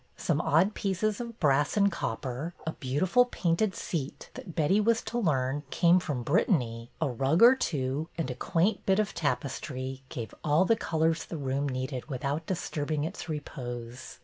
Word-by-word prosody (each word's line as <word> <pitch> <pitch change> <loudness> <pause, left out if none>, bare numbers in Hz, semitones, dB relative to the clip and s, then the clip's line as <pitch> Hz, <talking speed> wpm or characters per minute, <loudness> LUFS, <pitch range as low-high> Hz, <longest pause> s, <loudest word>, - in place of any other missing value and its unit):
Some - - 0
odd 175 +8 +3
pieces 205 +3 -1
of 235 -1 -7
brass 145 +3 +2
and 200 -1 +4
copper, 130 +7 -4
a 160 - -1
beautiful 160 - +2
painted 190 -2 0
seat 150 -5 -4
that, 175 - -9
Betty 180 +7 +3
was 230 +1 +2
to 240 - -2
learn, 145 - +1
came 175 +4 +4
from 140 -8 -3
Brit 145 - +2
tany, 115 - 0
a 160 - +1
rug 135 - +2
or 245 +2 +10
two, 145 - -2
and 160 -6 -1
a - - -2
quaint 175 - 0
bit 190 0 +4
of 215 -1 0
tap 140 -7 0
estry, 130 -1 -5
gave 115 -3 -6
all 155 +5 +4
the 225 - +4
colors 160 -5 0
the 165 - -6
room 140 0 -1
needed 130 +2 -4
without 140 +4 -2
disturbing 155 -4 -2
its 165 +2 -5
repose. 125 -5 -6
155 Hz, 175 wpm, -29 LUFS, 130-185 Hz, -, or